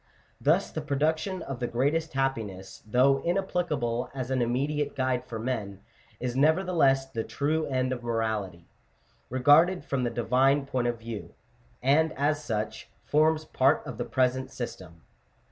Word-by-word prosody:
Thus - - +2
the - - -4
production 160 +6 -1
of 135 -3 -6
the 120 - -1
greatest 150 +7 0
happiness, 115 -9 -3
though 130 +5 +4
inapplicable 160 -10 -1
as 130 -1 -4
an 130 -1 +1
immediate 140 +5 -1
guide 130 -2 -1
for 120 -2 -5
men, 110 -5 -4 0.4
is 125 -1 -3
nevertheless 155 -2 +3
the 115 -4 -4
true 155 +5 -1
end 130 -1 0
of 125 - -6
morality, 110 -7 -2 0.6
re 130 +1 -3
garded 160 +5 +5
from 135 -2 -1
the 120 - +1
Divine 130 +5 +2
point 125 -3 -1
of 120 0 -1
view; 115 -2 -8 0.5
and 155 +4 +3
as 150 +2 0
such, 110 -3 -3 0.2
forms 155 +1 +2
part 130 -3 +2
of 120 - -7
the 120 - -1
present 130 +2 0
system 120 -6 -6
(Chap. 85 - -23
130 Hz, 155 wpm, -28 LUFS, 120-145 Hz, 0.6 s, garded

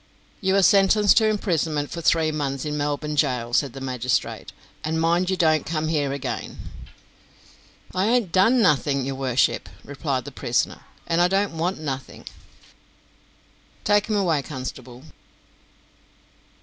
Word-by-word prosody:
"You 190 -1 +1
are 195 - +4
sentenced 200 +1 +5
to 220 - +5
imprisonment 165 -8 -1
for 170 - -5
three 160 -1 +2
months 140 -3 -3
in 150 0 -2
Melbourne 145 +1 -2
gaol," 125 -5 0
said 140 0 +1
the 135 - -8
magistrate; 125 -2 -2 0.3
"and 160 +1 -1
mind 170 +3 +2
you 190 - 0
don't 155 -4 +3
come 155 -1 -2
here 145 -4 0
again." 140 -1 -5 1.4
"I 185 +3 +1
ain't 230 -6 +1
done 225 +7 +4
nothing, 140 - +2
your 135 - -3
worship," 130 -2 0
replied - - -3
the - - -7
prisoner; - - -1 0.2
"and 165 +1 +1
I 175 - +5
don't 195 -1 0
want 175 +4 -1
nothing." 135 -4 -6 1.6
"Take 205 0 +2
him 215 - 0
away, 170 -7 +1
constable." 130 -2 -8
155 Hz, 140 wpm, -23 LUFS, 140-190 Hz, 1.6 s, sentenced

